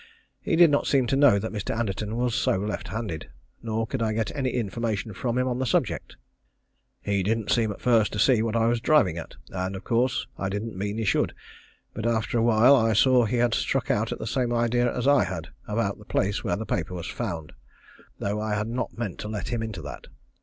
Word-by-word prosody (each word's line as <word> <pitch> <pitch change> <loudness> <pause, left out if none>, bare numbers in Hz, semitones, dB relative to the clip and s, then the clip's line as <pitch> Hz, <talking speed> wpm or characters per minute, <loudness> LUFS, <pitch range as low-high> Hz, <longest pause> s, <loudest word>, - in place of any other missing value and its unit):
He - - 0
did 170 -2 +7
not 145 - +1
seem 135 -3 +3
to 120 - 0
know 140 -7 +6
that 110 +3 -3
Mr. 105 +1 -3
Anderton 105 -1 -2
was 120 -1 0
so - - +1
left 105 +2 -3
handed, 95 - -5 0.3
nor 115 0 -1
could 125 +2 -4
I 110 -1 +1
get 110 +4 -2
any 135 -3 0
information 110 -2 -2
from 120 +5 -2
him 125 0 +1
on 125 0 -1
the 130 - 0
subject. - - -1 0.8
He 100 -1 0
didn't 110 +2 -1
seem 115 -3 +2
at 100 - -8
first 115 -4 +3
to - - -3
see 120 +2 +4
what 115 0 -1
I 115 -1 +3
was 115 0 +1
driving 95 - +3
at, - - -9 0.2
and, 95 +1 -3
of 95 - -7
course, 125 +2 +1
I 95 - -1
didn't 105 +2 -4
mean 100 +3 -3
he 115 - -1
should, - - +1 0.6
but 110 - -3
after 115 0 0
a - - +2
while 120 +4 +6
I 115 -3 +3
saw 125 +2 +5
he 120 +3 -1
had 120 -1 +2
struck 135 +1 0
out 110 +2 0
the - - -6
same 120 +1 0
idea 120 +1 +2
as 125 +1 -2
I 145 0 +5
had 85 -2 -5 0.2
about 105 -2 -1
the 105 - -14
place 100 0 0
where - - 0
the 110 - -4
paper 90 -2 -2
was 85 - -5
found, 80 -3 -5 0.6
though 105 +1 -2
I 110 -1 -1
had 105 +1 -2
not 120 +1 -3
meant 115 -6 -4
to - - -5
let 105 -1 -4
him 120 -2 -1
into 110 -7 -5
that. 70 -3 -8
110 Hz, 230 wpm, -26 LUFS, 100-120 Hz, 0.8 s, did